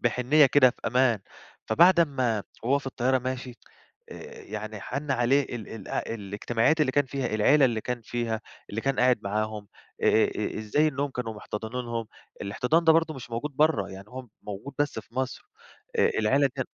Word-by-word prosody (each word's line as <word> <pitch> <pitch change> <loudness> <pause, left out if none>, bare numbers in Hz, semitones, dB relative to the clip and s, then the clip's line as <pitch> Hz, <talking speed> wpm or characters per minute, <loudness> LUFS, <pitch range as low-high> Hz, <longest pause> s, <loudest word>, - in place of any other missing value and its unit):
بحنيّة 125 +5 +4
كده 130 -1 +5
في - - -17
أمان، 120 -2 +3 0.5
فبعد 175 +2 +5
أمّا 130 -9 +1 0.2
وهو 135 +5 +2
في 135 - -11
الطيارة 130 0 +1
ماشي 130 0 -5 0.6
آآ - - -10
يعني 110 0 -6
حَن 140 +7 -5
عليه 135 +2 +3
ال 120 -4 -7
ال 110 -4 -9
الاجتماعيات 115 +7 -1
اللي 130 -4 +2
كان 145 -2 +2
فيها، 135 0 -3
العيلة 135 +7 +5
اللي 115 -4 +1
كان 125 +2 -4
فيها، 115 -1 -2 0.3
اللي 110 - -3
كان 135 +2 0
قاعد 125 -1 +4
معاهم، 105 0 -3 0.3
آآ - - +3 0.2
آآ - - 0 0.3
آآ - - -3
ازاي 125 +9 +2
إنهم 140 -1 -2
كانوا 120 -3 -4
محتضنينهم. 115 +2 -5 0.3
الاحتضان 125 +11 +1
ده 160 - +7
برضه 165 -1 +2
مش 125 -3 -9
موجود 120 +6 -3
برّا، 150 -11 +2
يعني 95 +1 -10
هو 130 +2 -8 0.2
موجود 105 +7 -7
بس 145 -5 0
في 110 +1 -11
مصر، 130 0 -3 0.6
آآ - - +4
العيلة 135 +6 +3
ديًّا 130 - -1
125 Hz, 180 wpm, -27 LUFS, 110-140 Hz, 0.6 s, ده